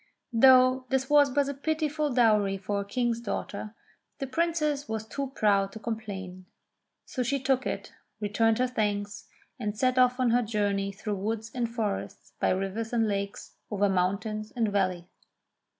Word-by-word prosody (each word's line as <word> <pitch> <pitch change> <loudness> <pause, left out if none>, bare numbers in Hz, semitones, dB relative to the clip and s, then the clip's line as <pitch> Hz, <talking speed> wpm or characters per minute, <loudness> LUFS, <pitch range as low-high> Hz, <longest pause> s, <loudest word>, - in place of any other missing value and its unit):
Though 255 +1 +6
this 265 +1 0
was 290 -1 +6
but 280 +1 +1
a 280 - -2
pitiful 305 +1 -1
dowry 215 -5 +3
for 200 +1 -2
a - - -6
King's 235 +2 -1
daughter, 210 -1 -5 0.4
the 275 - -3
Princess 300 0 0
was 220 -1 -3
too 275 +5 -4
proud 200 -2 +2
to 220 - -8
complain; 195 -5 -6 0.6
so 255 - -4
she 275 +3 0
took 265 0 +1
it, - - -5 0.3
returned 220 +2 +2
her 255 - +2
thanks, 205 -4 -2 0.3
and 210 -2 -3
set 255 +2 +2
off 250 0 +4
on 250 -2 +3
her 245 +1 +4
journey 205 -3 0
through 205 +1 -4
woods 220 +3 -3
and 240 -2 -1
forests, 220 -4 -4
by - - +2
rivers 195 +4 -2
and 225 -2 +2
lakes, 200 -1 -4
over 205 0 +2
mountain 200 +3 0
and 230 -3 +1
valley. 185 -3 0
225 Hz, 165 wpm, -28 LUFS, 200-255 Hz, 0.6 s, Though